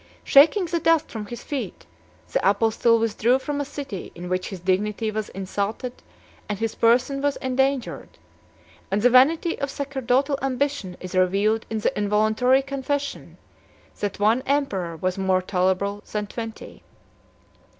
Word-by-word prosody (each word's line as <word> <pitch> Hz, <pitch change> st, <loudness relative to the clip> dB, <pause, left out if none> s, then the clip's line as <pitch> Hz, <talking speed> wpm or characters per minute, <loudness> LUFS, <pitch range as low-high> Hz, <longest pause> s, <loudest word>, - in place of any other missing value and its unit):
Shaking 320 Hz, +7 st, +6 dB
the 340 Hz, 0 st, -1 dB
dust 325 Hz, -1 st, +2 dB
from 215 Hz, -2 st, -6 dB
his 240 Hz, +3 st, -8 dB
feet, 285 Hz, -3 st, -5 dB, 0.5 s
the -, -, +3 dB
apostle 225 Hz, +3 st, +3 dB
withdrew 230 Hz, +2 st, +2 dB
from 290 Hz, +1 st, -3 dB
a -, -, 0 dB
city 275 Hz, -9 st, -7 dB
in 175 Hz, +1 st, -7 dB
which 185 Hz, 0 st, -1 dB
his 190 Hz, -, -7 dB
dignity 210 Hz, +4 st, 0 dB
was 215 Hz, 0 st, -3 dB
insulted 200 Hz, +6 st, -3 dB, 0.6 s
and 210 Hz, -, -2 dB
his 225 Hz, +1 st, -2 dB
person 250 Hz, +4 st, +2 dB
was 285 Hz, 0 st, +1 dB
endangered; 265 Hz, 0 st, -1 dB, 0.7 s
and 205 Hz, +2 st, 0 dB
the 245 Hz, -, +5 dB
vanity 310 Hz, +7 st, +4 dB
of 280 Hz, -, -2 dB
sacerdotal 275 Hz, 0 st, 0 dB
ambition 270 Hz, -8 st, -2 dB
is 185 Hz, -1 st, -8 dB
revealed 195 Hz, +4 st, +2 dB
in 220 Hz, -1 st, -2 dB
the -, -, 0 dB
involuntary 215 Hz, +6 st, +2 dB
confession, 275 Hz, +1 st, -4 dB, 0.6 s
that 205 Hz, -1 st, -3 dB
one 220 Hz, +5 st, +3 dB
emperor 195 Hz, -, -1 dB
was 185 Hz, +3 st, -2 dB
more 190 Hz, -1 st, +2 dB
tolerable 190 Hz, +2 st, 0 dB
than 210 Hz, -1 st, -2 dB
twenty. 225 Hz, +2 st, -8 dB
225 Hz, 145 wpm, -24 LUFS, 200-275 Hz, 0.7 s, Shaking